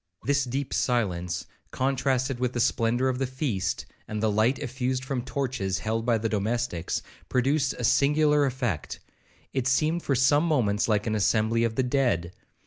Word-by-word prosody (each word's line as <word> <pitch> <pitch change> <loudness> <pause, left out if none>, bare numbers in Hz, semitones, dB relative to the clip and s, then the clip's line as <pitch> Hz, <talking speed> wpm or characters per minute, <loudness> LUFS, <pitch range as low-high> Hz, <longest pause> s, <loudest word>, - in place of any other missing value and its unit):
This 140 -1 +1
deep 135 +2 -3
silence, 90 -8 0 0.2
contrasted 130 -1 0
with 125 0 -1
the 120 - -2
splendour 120 +2 +2
of 130 -1 -1
the 135 - 0
feast, 130 - -2 0.2
and 110 - -4
the 110 0 +1
light 110 +6 +2
effused 130 -1 -2
from 130 -2 -2
torches 120 -8 -2
held 115 +3 -2
by 115 -2 +4
the 110 +1 -1
domestics, 110 -4 -1 0.3
produced 135 +2 +1
a 125 - -7
singular 150 +3 +3
effect,—it 125 - -5
seemed 155 +6 +2
for 140 - 0
some 140 +5 +4
moments 110 -10 +1
like 105 -2 +1
an 110 - -1
assembly 110 +2 +2
of 115 -1 0
the 130 - +2
dead. 125 -10 0
125 Hz, 160 wpm, -26 LUFS, 110-135 Hz, 0.3 s, by